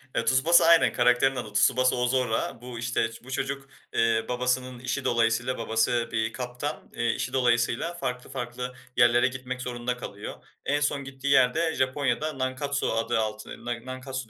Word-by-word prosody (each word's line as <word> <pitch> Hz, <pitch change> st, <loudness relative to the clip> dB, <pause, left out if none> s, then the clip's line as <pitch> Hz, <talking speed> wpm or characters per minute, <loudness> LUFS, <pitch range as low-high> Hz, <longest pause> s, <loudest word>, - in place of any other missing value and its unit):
Ya, 115 Hz, -, 0 dB
Tsubasa 135 Hz, +8 st, +5 dB
Aynen, 170 Hz, 0 st, +6 dB
karakterin 125 Hz, +2 st, +3 dB
adı 110 Hz, -4 st, -5 dB
Tsubasa 130 Hz, +4 st, +3 dB
Oozora. 125 Hz, -2 st, 0 dB
Bu, 125 Hz, -1 st, -7 dB
işte, 120 Hz, -1 st, 0 dB
iş 115 Hz, -, -13 dB
bu 130 Hz, -, -11 dB
çocuk, 135 Hz, +1 st, -3 dB, 0.2 s
eee, 115 Hz, -1 st, +2 dB
babasının 125 Hz, 0 st, -1 dB
işi 130 Hz, +2 st, -3 dB
dolayısıyla 120 Hz, +2 st, +1 dB
babası 115 Hz, +1 st, +1 dB
bir 110 Hz, 0 st, -1 dB
kaptan, 125 Hz, +3 st, -5 dB
eee, 120 Hz, 0 st, 0 dB
işi -, -, -3 dB
dolayısıyla 120 Hz, +4 st, +1 dB
farklı 125 Hz, -7 st, -4 dB
farklı 125 Hz, -1 st, -5 dB, 0.2 s
yerlere 120 Hz, +1 st, +5 dB
gitmek 130 Hz, 0 st, -5 dB
zorunda 125 Hz, 0 st, -3 dB
kalıyor. 100 Hz, -4 st, -7 dB, 0.3 s
En 145 Hz, +1 st, +1 dB
son 145 Hz, -1 st, 0 dB
gittiği 135 Hz, +1 st, -7 dB
yer 130 Hz, -3 st, +5 dB
de 165 Hz, 0 st, 0 dB
Japonya'da 135 Hz, +2 st, 0 dB
Nankatsu 140 Hz, +2 st, -1 dB
adı 115 Hz, 0 st, 0 dB
altı 110 Hz, -1 st, -3 dB, 0.2 s
N 120 Hz, 0 st, -4 dB
Nankatsu 130 Hz, -1 st, -6 dB
125 Hz, 165 wpm, -27 LUFS, 120-135 Hz, 0.3 s, Aynen